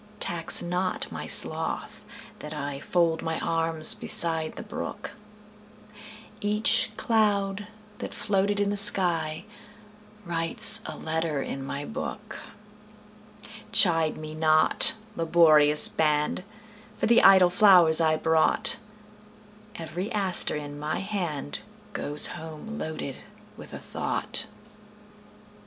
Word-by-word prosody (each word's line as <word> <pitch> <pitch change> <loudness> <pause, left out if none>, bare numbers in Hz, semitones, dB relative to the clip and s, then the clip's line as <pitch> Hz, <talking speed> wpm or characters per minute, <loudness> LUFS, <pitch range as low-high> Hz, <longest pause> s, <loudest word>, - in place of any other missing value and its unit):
Tax 165 -1 +1
not 180 +1 -4
my - - -8
sloth - - +1 0.4
that 150 0 -9
IFold 155 +3 -2
my 160 -1 -4
arms 165 -1 +3
beside 160 -2 0
the - - -9
brook; 210 - -8 1.3
Each 210 +2 -1
cloud 205 -3 -1 0.3
that - - -7
floated 205 0 -2
in 205 0 -1
the 205 - -3 1.5
skyWrites 165 -1 +4
a - - -8
letter 160 -2 -4
in 135 - -7
my 140 +1 -7
book. 250 - -8 1.3
Chide 165 -4 +2
me 155 0 -9
not, 155 +5 +2 0.2
laborious 155 -3 +3
band, 150 +2 -1 0.5
For - - -2
the 235 +1 +3
idle 190 -2 +5
flowers 180 -6 +4
I 160 -1 +1
brought; 160 +7 +2 1.0
Every 180 +3 -7
aster 195 -4 +2
in 145 -1 -8
my 155 +5 -4
handGoes 150 - -1
home 160 +7 -9
loaded 155 -4 -7 0.4
with - - -13
a - - -8
thought. - - -2
165 Hz, 105 wpm, -25 LUFS, 155-195 Hz, 1.5 s, idle